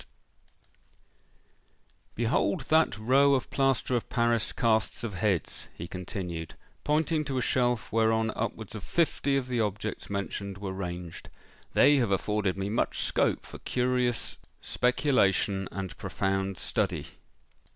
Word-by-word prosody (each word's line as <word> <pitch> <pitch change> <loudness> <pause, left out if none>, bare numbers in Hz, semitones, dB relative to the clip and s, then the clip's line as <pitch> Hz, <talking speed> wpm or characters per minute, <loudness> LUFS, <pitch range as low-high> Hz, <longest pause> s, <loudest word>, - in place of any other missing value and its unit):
"Behold 115 -3 +1
that 160 -9 +4
row 135 +5 +4
of 130 - -3
plaster 135 -2 +1
of 120 - -2
Paris 120 -2 +1
casts 115 0 +1
of 115 -4 -3
heads," 95 -2 -1
he 85 - -6
continued, 90 -3 -5 0.3
pointing 155 +1 +1
to 135 -2 -3
a - - +1
shelf 125 -2 +1
whereon 110 0 +2
upwards 110 -2 -4
of 105 -4 -7
fifty 145 -4 +1
of 130 -2 -2
the 125 -2 -1
objects 105 0 -2
mentioned 100 0 -4
were 95 -1 -4
ranged: 90 -3 -6 0.5
"they 145 0 +6
have 120 -5 +2
afforded 100 0 0
me 95 0 -2
much 105 +3 0
scope - - +1
for - - -10
curious 125 -1 0 0.2
speculation 105 -7 +1
and 95 0 -5
profound 95 0 -1
study." - - -1
110 Hz, 130 wpm, -28 LUFS, 95-125 Hz, 0.5 s, they